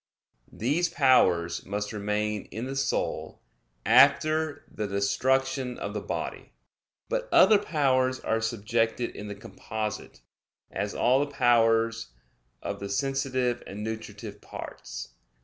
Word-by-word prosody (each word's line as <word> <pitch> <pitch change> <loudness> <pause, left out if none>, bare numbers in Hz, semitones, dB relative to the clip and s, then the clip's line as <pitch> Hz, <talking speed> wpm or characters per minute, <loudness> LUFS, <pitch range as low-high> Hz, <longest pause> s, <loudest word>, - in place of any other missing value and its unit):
These 150 +10 0
powers 95 - +3
must 105 +3 -4
remain 105 0 -2
in 115 +3 -6
the 135 +1 -5
soul, 135 -1 -2 0.4
after 145 - +4
the 105 -1 -4
destruction 130 +6 0
of - - -5
the - - -3
body. - - -5 0.5
But - - -2
other 205 +2 +7
powers 130 -8 +1
are 115 0 -1
subjected 115 +1 -1
in 105 - -7
the 100 - -6
composite; 105 - -6 0.5
as - - -3
all 125 +2 +3
the 145 0 -1
powers 115 -3 +3 0.6
of - - -4
the 100 - -5
sensitive 130 +1 0
and 105 +2 -6
nutritive 110 -1 -6
parts. - - -8
115 Hz, 120 wpm, -27 LUFS, 105-135 Hz, 0.6 s, other